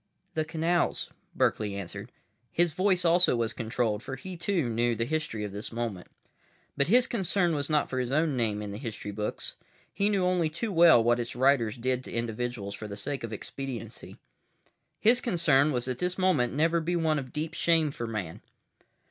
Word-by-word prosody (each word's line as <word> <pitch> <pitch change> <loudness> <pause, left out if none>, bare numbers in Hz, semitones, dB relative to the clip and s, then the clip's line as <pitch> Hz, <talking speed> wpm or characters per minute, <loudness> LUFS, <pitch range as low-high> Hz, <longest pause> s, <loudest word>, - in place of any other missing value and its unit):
"The 155 -1 -1
canals," 165 +2 0 0.2
Berkeley 105 -2 +1
answered. 100 +4 -7 0.4
His 175 -2 +2
voice 185 0 +2
also 175 -3 +5
was 115 -2 -1
controlled, 115 -2 -1
for 130 - -5
he, 185 +7 -8
too, 170 -4 0
knew 120 +1 +1
the 115 +1 -1
history 155 -7 -2
of 105 - -4
this 105 +2 -6
moment. 115 -6 -4 0.7
But 140 - +2
his 245 +6 +5
concern 190 -6 +1
was 145 -1 -2
not 150 -2 +2
for 130 - -3
his 125 0 -2
own 155 0 +2
name 110 -4 0
in 105 - -5
the 100 - -6
history 110 -5 -5
books. 105 +1 -4 0.4
He 200 +1 +1
knew 195 -3 +1
only 180 -3 +2
too 210 +8 -3
well 165 -9 +7
what 120 +1 +3
its 120 0 -4
writers 125 -4 +2
did 130 +1 -1
to - - -8
individuals 115 -3 -3
for 110 +2 -6
the 100 -1 -7
sake 135 +6 -4
of 115 - -5
expediency. 115 +1 -7 0.8
His 240 +3 +4
concern 155 - +3
was 125 -3 -1
that 125 -1 -3
this 180 0 -1
moment 170 -11 +2
never 165 +4 +2
be 175 +2 -1
one 160 -3 +1
of 130 -2 -8
deep 155 +2 -4
shame 165 -3 +2
for 120 -4 -5
Man. 100 -7 -5
135 Hz, 190 wpm, -28 LUFS, 115-170 Hz, 0.8 s, well